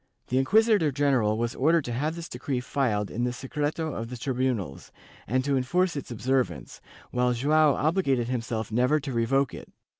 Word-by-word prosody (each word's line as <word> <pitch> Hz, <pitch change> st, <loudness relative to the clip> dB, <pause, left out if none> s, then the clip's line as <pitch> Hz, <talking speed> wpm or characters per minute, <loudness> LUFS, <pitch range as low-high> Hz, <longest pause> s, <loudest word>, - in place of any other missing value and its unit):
The 130 Hz, -, +2 dB
inquisitor 205 Hz, -, +3 dB
general 130 Hz, -7 st, +2 dB
was 120 Hz, +1 st, -1 dB
ordered 160 Hz, +3 st, +2 dB
to 120 Hz, -, -4 dB
have 150 Hz, +7 st, -1 dB
this 170 Hz, -1 st, -7 dB
decree 125 Hz, +1 st, -3 dB
filed 115 Hz, -6 st, -1 dB
in 120 Hz, -, -2 dB
the 125 Hz, -, 0 dB
secreto 150 Hz, +4 st, -3 dB
of 115 Hz, 0 st, -5 dB
the 125 Hz, -, -6 dB
tribunals, 125 Hz, -, -2 dB, 0.4 s
and 130 Hz, +4 st, 0 dB
to 140 Hz, -1 st, +1 dB
enforce 175 Hz, +7 st, +1 dB
its 140 Hz, -, -5 dB
observance, 130 Hz, +2 st, -2 dB, 0.3 s
while 125 Hz, 0 st, +1 dB
Joao 150 Hz, +4 st, +3 dB
obligated 140 Hz, -7 st, +1 dB
himself 115 Hz, -3 st, -3 dB
never 125 Hz, +7 st, +2 dB
to 140 Hz, -2 st, -5 dB
revoke 120 Hz, +3 st, +1 dB
it. -, -, -10 dB
130 Hz, 175 wpm, -27 LUFS, 120-150 Hz, 0.4 s, inquisitor